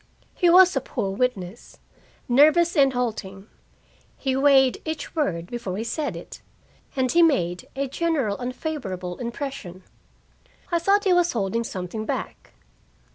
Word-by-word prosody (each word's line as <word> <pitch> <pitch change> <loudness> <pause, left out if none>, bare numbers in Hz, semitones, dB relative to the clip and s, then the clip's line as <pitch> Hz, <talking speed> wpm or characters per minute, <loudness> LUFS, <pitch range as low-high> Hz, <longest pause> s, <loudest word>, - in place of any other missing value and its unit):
He 355 - +2
was 365 0 +7
a 270 - +1
poor 195 -4 -3
witness, 200 -3 -3 0.5
nervous 310 +7 +4
and 275 -3 +5
halting. 210 -5 -4 0.7
He 265 -2 -1
weighed 270 -2 +4
each 315 +1 -5
word 180 - -1
before 200 -3 -5
he 220 - -2
said 255 - -3
it, 170 - -10 0.5
and 260 -2 +1
he 345 - +4
made 180 - +1
a 275 +1 -1
general 275 -7 -1
unfavorable 245 - -5
impression. 235 -7 -6 0.9
I 340 - +2
thought 395 +4 +2
he 375 - +3
was 355 -1 +2
holding 230 +1 -1
something 205 +1 -5
back. - - -5
255 Hz, 135 wpm, -24 LUFS, 195-310 Hz, 0.9 s, was